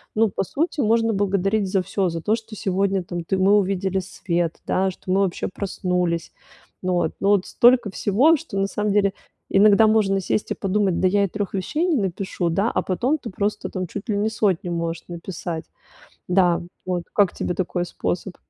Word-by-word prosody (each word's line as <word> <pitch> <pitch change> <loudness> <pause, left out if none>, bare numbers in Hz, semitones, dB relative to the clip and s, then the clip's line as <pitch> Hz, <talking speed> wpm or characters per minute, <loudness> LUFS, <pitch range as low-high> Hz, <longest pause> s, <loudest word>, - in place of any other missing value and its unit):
ну, 220 0 +3
по 195 - -2
сути, 315 - -2
можно 225 0 +2
благодарить 195 0 +1
за 190 - +2
всё. 195 +1 -1
За 165 -1 -4
то, 215 +4 +2
что 225 -1 -9
сегодня, 195 -2 0
там, 175 -1 -5
ты 190 - 0
мы 190 +2 +4
увидели 190 -1 0
свет, 175 -2 -2
да, 190 0 +1
что 185 0 -7
мы 195 +1 +3
вообще 185 -1 -1
проснулись. 180 -4 -2 0.5
Ну 185 0 -1
вот. 175 -2 0
Ну 195 - +1
вот 200 -2 +3
столько 240 -4 +4
всего, 245 - +3
что 280 -11 -7
на 195 0 +1
самом 210 0 -1
деле 200 -1 +3 0.4
иногда 210 +2 +6
можно 205 -3 +3
сесть 205 - -1
и - - +3
подумать: 195 -2 0
"Да 185 - +3
я 200 +2 +2
и - - -2
3 205 +1 -4
вещей 300 - -1
не 320 -6 +2
напишу", 185 -2 -2
да, 200 +7 +1
а - - 0
потом 245 - 0
ты 255 -6 -8
просто, 205 +2 -2
там, 185 -2 -4
чуть 200 +6 -7
ли 210 - +1
не 210 +2 +1
100 190 -5 0
можешь 165 -1 -3
написать. 170 -1 -6 0.6
Да, 180 -2 +3 0.2
вот. 180 -2 -2
Как 200 -4 +3
тебе 180 - -2
такой 180 -1 -1
способ? 175 +2 -3
195 Hz, 200 wpm, -23 LUFS, 180-210 Hz, 0.6 s, иногда